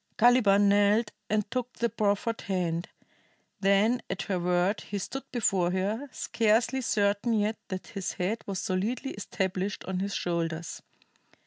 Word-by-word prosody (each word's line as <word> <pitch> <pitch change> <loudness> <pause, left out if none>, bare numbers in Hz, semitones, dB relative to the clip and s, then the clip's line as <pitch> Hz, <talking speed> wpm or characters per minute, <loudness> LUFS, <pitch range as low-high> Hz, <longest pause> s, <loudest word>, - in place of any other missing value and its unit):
Caliban 215 -4 +5
knelt 205 +2 +3 0.2
and 210 -1 +1
took 250 -1 -2
the 235 - 0
proffered 215 +1 0
hand, 175 -3 -2 0.7
then 200 +5 +3
at - - -2
her 190 -3 -1
word 180 +3 +1
he 205 - -5
stood 270 +8 -4
before 195 -8 +2
her, 205 +9 -1
scarcely 230 +4 +1
certain 205 0 +1
yet 215 0 +1
that 185 -2 -5
his 195 -4 -4
head 210 +5 -2
was 195 -2 -3
solidly 220 +8 -1
established 190 0 -3
on 185 -1 -2
his 200 0 -2
shoulders. 165 -2 -2
200 Hz, 140 wpm, -28 LUFS, 185-225 Hz, 0.7 s, Caliban